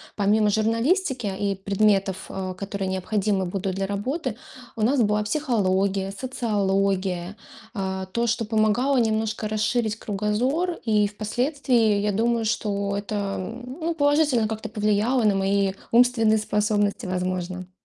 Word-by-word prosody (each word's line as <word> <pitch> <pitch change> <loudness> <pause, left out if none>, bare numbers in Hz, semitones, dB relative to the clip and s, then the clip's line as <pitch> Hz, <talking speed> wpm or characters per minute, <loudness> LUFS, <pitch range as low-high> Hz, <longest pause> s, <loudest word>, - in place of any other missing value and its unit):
помимо 210 +1 +3
журналистики 235 - +1
и 200 -1 0
предметов, 195 -1 +1
а, 185 -1 -4
которые 200 0 -4
необходимы 195 +1 0
будут 190 +1 -3
для 195 0 -1
работы, 240 - -3 0.4
у 225 - -5
нас 255 +6 +3
была 210 -1 +2
психология, 200 -6 0
социология. 195 -5 -1 0.4
А, 190 -3 -3
то, 235 +5 -1
что 230 +1 0
помогало 220 +5 +2
немножко 220 -2 0
расширить 215 +1 0
кругозор. 225 - -1
И 210 -2 +3
впоследствии, 230 +1 +1
я 210 0 +1
думаю, 230 +3 +1
что 200 -2 -1
это, 205 +1 -4 0.2
м, 245 +7 -7
ну 335 +1 0
положительно 290 -6 +3
как-то 220 0 -4
повлияло 215 +3 +1
на 210 -2 +3
мои 195 0 +1 0.2
умственные 230 -2 +4
способности, 210 +1 0
возможно. 185 0 -3
210 Hz, 130 wpm, -24 LUFS, 195-235 Hz, 0.4 s, умственные